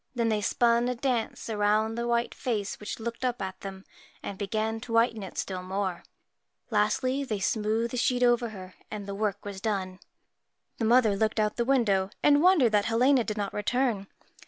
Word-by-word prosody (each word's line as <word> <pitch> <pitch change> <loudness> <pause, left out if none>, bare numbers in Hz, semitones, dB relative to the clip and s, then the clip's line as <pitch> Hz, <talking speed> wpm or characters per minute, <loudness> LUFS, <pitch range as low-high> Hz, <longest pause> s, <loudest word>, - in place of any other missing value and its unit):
Then 235 -1 +1
they 215 -1 +1
spun 235 +3 +2
a 250 - -1
dance 240 -2 -2
around 215 0 +1
the 235 +1 -3
white 235 0 0
face 210 -5 -3
which 210 - -6
looked 235 +2 -5
up 250 -1 0
at 190 -1 -5
them, 195 -1 -8 0.4
and 200 - -5
began 215 +3 -2
to 230 0 -7
whiten 230 -1 +3
it 190 - -8
still 185 -2 -3
more; 185 -1 -3 0.7
lastly, 225 +6 +1
they 220 -7 -3
smoothed 220 +3 0
the - - -2
sheet 250 0 +1
over 240 -1 +3
her, 185 -3 -10 0.2
and 210 -2 -6
the 200 - -5
work 205 0 -2
was 200 -2 -6
done. 190 -4 -2 0.8
The 225 - 0
mother 225 -3 +4
looked 220 +2 0
out 210 0 +2
of - - -31
the 235 - +1
window 210 -8 +2
and 290 0 +5
wondered 335 - +5
that 210 -1 +2
Helena 245 +3 +3
did 215 -1 -4
not 200 -1 -2
return. 215 -1 0
220 Hz, 195 wpm, -28 LUFS, 200-240 Hz, 0.8 s, and